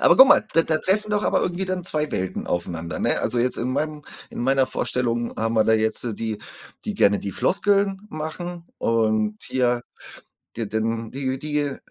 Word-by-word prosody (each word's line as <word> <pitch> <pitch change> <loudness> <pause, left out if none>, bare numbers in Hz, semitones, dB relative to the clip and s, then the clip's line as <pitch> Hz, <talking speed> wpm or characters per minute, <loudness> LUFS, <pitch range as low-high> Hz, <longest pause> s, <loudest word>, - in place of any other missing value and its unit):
Aber - - +6
guck 265 - +10
mal, 295 - +6
da 165 - +6
da 155 -1 +1
treffen 210 +3 0
doch 210 - +1
aber - - +2
irgendwie 180 +2 -1
dann 185 -1 -2
2 155 -4 -1
Welten 95 0 -2
aufeinander, 85 -2 -3
ne? - - +1
Also, 120 - 0
jetzt 125 +2 +1
in 125 +2 -1
meinem 150 +1 -2 0.3
in - - -6
meiner 135 +1 +3
Vorstellung 120 -2 -1
haben 115 +1 -1
wir 110 - +5
da 110 - +3
jetzt 110 0 0 0.2
die, 110 -2 -3 0.5
die - - -3
gerne 100 0 +4
die 100 - -4
Floskeln 195 0 +1
machen 170 +3 -5
und 110 -2 +1
hier 125 -2 0 0.7
d 115 - -2
denn 110 +1 -2
die 130 -1 -2
die 150 -1 -1
130 Hz, 185 wpm, -23 LUFS, 110-165 Hz, 0.7 s, guck